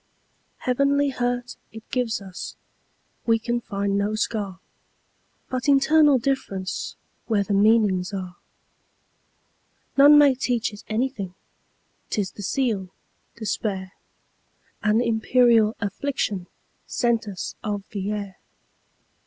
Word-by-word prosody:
Heavenly 280 +3 +2
hurt 245 -1 -2
it 220 0 -11
gives 235 -5 -1
us; 190 -2 -7 0.7
We 225 0 +5
can 240 +2 -2
find 200 -1 -1
no 205 +2 0
scar, 205 -4 -2 0.9
But 255 +2 -2
internal 290 +1 +5
differenceWhere 205 -3 -3
the 205 - -1
meanings 205 -2 +3
are. 185 -3 -6 1.6
None 290 +2 +9
may 290 -2 +7
teach 245 -4 -1
it 205 - -11
anything,'T 215 -4 -6
is 195 -2 -1
the - - -10
seal, 205 -3 -1 0.5
despair,—An 210 +1 -4
imperial 230 -1 +3
afflictionSent 220 +1 -2
us 195 -3 -5
of 205 -1 -2
the 200 -1 -3
air. 200 -3 -5
220 Hz, 95 wpm, -24 LUFS, 200-250 Hz, 1.6 s, None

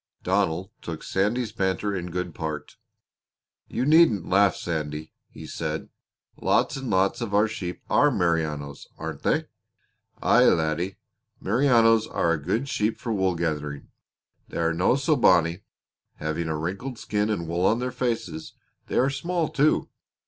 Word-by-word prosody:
Donald 95 0 0
took 80 -2 -6
Sandy's 110 +4 0
banter 100 0 -1
in 90 -1 -4
good 90 -1 -3
part. 75 -2 -5 0.9
"You - - -2
needn't 150 - +5
laugh, 100 0 +4
Sandy," 80 -2 -4 0.2
he - - -11
said. - - -4 0.5
"Lots - - +2
and 135 -2 -5
lots 95 +3 +2
of 105 -4 -2
our 105 +2 +4
sheep 90 -5 -6
are 145 - +4
Merinos, 80 - -1
aren't - - -6
they?" - - +1 0.7
"Aye, - - +5
laddie. 85 +4 +1 0.4
Merinos 115 -1 +4
are 85 - 0
a 80 - -2
good 110 - -1
sheep 110 -4 0
for 115 - -3
wool 95 -3 +1
growing. 75 -4 -3 0.6
They - - -7
are 85 0 +1
no 90 +8 +3
so 140 +3 +2
bonny 85 - +4 0.6
having 80 +2 -3
a 80 -1 -1
wrinkled 95 - -4
skin 105 0 -1
and 85 -6 -2
wool 85 +3 +1
on 115 - +3
their 125 +1 -2
faces; 115 -11 -3 0.3
they - - -2
are 135 +2 +3
small, 170 +3 -1
too. 150 +2 +2
95 Hz, 150 wpm, -25 LUFS, 85-115 Hz, 0.9 s, needn't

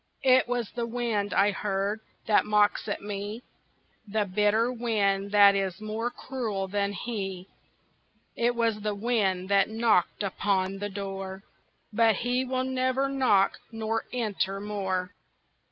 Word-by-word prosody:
It 260 -1 +5
was 245 -3 -2
the 235 -1 -3
wind 230 -4 -1
I 205 +1 +3
heard, 200 +1 -2 0.3
that 215 - +4
mocks 210 0 +2
at 205 - -3
me, 205 +3 -5 0.6
The 210 0 0
bitter 210 +5 +2
wind 200 -5 0
that 205 -1 +7
is 195 -2 -2
more 215 +2 -3
cruel 225 -7 -4
than 200 +1 -1
he; 195 -3 -5 0.9
It 240 +1 +1
was 230 -2 0
the 210 0 -2
wind 200 -4 0
that 200 0 +4
knocked 220 -4 +1
upon 195 0 0
the 205 +1 -3
door, 195 -1 -6 0.5
But 225 0 +4
he 245 +4 0
will 255 0 -1
never 260 +1 0
knock 250 -8 +2
nor 225 0 -2
enter 205 -5 -1
more. 190 -3 -3
210 Hz, 135 wpm, -27 LUFS, 195-235 Hz, 0.9 s, that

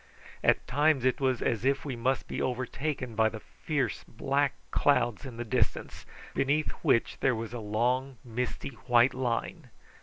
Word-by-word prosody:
At - - +3
times 145 -1 +2
it 130 +1 +2
was 130 -3 +1
as 115 -1 0
if 135 +2 +1
we 135 -4 -3
must 125 +3 0
be - - -3
overtaken 130 +1 -2
by 110 0 +3
the 110 - -7
fierce - - -3
black 140 0 0 0.2
clouds 125 -3 +2
in 120 -3 -9
the 120 - -4
distance, 110 - -1 0.3
beneath 145 +3 +1
which 135 -7 +2
there 130 -2 +2
was 115 +1 -5
a 120 - -4
long 125 +5 0
misty 125 +3 -3 0.2
white 120 +1 +5
line. 125 -2 -2
125 Hz, 160 wpm, -29 LUFS, 115-135 Hz, 0.3 s, white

